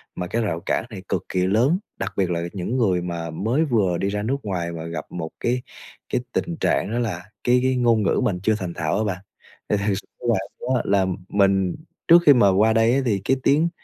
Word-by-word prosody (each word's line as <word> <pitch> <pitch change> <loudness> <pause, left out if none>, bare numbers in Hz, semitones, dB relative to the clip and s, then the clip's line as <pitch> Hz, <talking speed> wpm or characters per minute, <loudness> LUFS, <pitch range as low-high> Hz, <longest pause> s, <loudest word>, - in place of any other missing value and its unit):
mà 90 -1 -4
cái 115 +5 -1
rào 85 -6 -2
cản 110 - -1
này 95 -4 -9
cực 95 - -1
kỳ 90 -1 +1
lớn, 120 - +3 0.2
đặc - - -3
biệt 95 -2 +1
là 85 0 -1
những 100 +7 -2
người 95 -7 +2
mà 85 -1 -4
mới 115 - 0
vừa 105 - +1
đi 100 - -1
ra 105 0 -2
nước 135 +5 0
ngoài 90 -4 -3
mà 80 -1 -6
gặp 85 - -5
một 80 -2 -4
cái 125 +1 0 0.5
cái 125 - 0
tình 170 -1 -2
trạng 105 - +1
đó 120 - -1
là 95 -7 -2 0.2
cái 125 +1 +4
cái 130 0 +2
ngôn 115 -3 +3
ngữ - - +2
mình 90 -4 0
chưa 110 +1 +3
thành 90 -2 -4
thạo 80 0 -1
á 110 - +1
bạn. 95 -3 -2 0.5
Thì 105 - +2
thật 100 +1 0
s 95 - -6 0.3
là 115 - +3 0.2
đó, 130 -1 0
là 100 -1 +3 0.2
mình 95 -2 +2 0.3
trước 170 +1 +8
khi 145 - +10
mà 110 -6 +5
qua 110 +3 +4
đây 115 +3 +3
á 140 - +2
thì 100 -5 +1
cái 135 - +2
tiếng 155 +4 +3
100 Hz, 240 wpm, -23 LUFS, 90-120 Hz, 0.5 s, khi